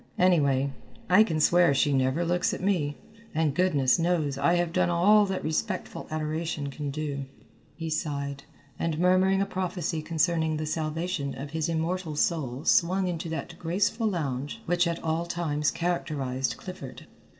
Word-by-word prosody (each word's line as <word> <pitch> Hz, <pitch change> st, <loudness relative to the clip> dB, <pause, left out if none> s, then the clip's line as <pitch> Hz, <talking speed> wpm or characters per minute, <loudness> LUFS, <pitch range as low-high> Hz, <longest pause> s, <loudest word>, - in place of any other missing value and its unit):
Anyway, 140 Hz, -7 st, +3 dB, 0.4 s
I 200 Hz, +4 st, +8 dB
can 160 Hz, -7 st, -1 dB
swear 170 Hz, -1 st, +4 dB
she 140 Hz, +1 st, +2 dB
never 135 Hz, +5 st, +1 dB
looks 175 Hz, +1 st, +1 dB
at -, -, -8 dB
me, 160 Hz, -8 st, 0 dB, 0.4 s
and 155 Hz, -2 st, +2 dB
goodness 150 Hz, -5 st, +3 dB
knows 165 Hz, -5 st, +1 dB
I 145 Hz, +6 st, +2 dB
have 175 Hz, -1 st, 0 dB
done -, -, +2 dB
all 200 Hz, +5 st, +5 dB
that 190 Hz, -1 st, -3 dB
respectful 185 Hz, +5 st, -3 dB
adoration 155 Hz, -1 st, -3 dB
can 145 Hz, +1 st, -4 dB
do." 140 Hz, -1 st, -3 dB, 0.5 s
He 165 Hz, +1 st, -5 dB
sighed, 140 Hz, -2 st, -3 dB, 0.4 s
and 165 Hz, -2 st, -1 dB
murmuring 185 Hz, +2 st, +3 dB
a -, -, -1 dB
prophecy 180 Hz, -4 st, -2 dB
concerning 160 Hz, 0 st, +1 dB
the 155 Hz, -, -3 dB
salvation 155 Hz, -1 st, -2 dB
of 140 Hz, +1 st, -6 dB
his 160 Hz, +1 st, -1 dB
immortal 165 Hz, 0 st, -2 dB
soul 145 Hz, -3 st, -1 dB
swung 185 Hz, +2 st, +3 dB
into 170 Hz, -2 st, -3 dB
that 160 Hz, -, -5 dB
graceful 205 Hz, +7 st, 0 dB
lounge 145 Hz, -8 st, -3 dB
which 175 Hz, +1 st, +2 dB
at 170 Hz, 0 st, -3 dB
all 165 Hz, +1 st, -1 dB
times 150 Hz, -4 st, 0 dB
characterized 140 Hz, -7 st, -2 dB
Clifford. 180 Hz, -8 st, -9 dB
160 Hz, 155 wpm, -27 LUFS, 145-175 Hz, 0.5 s, I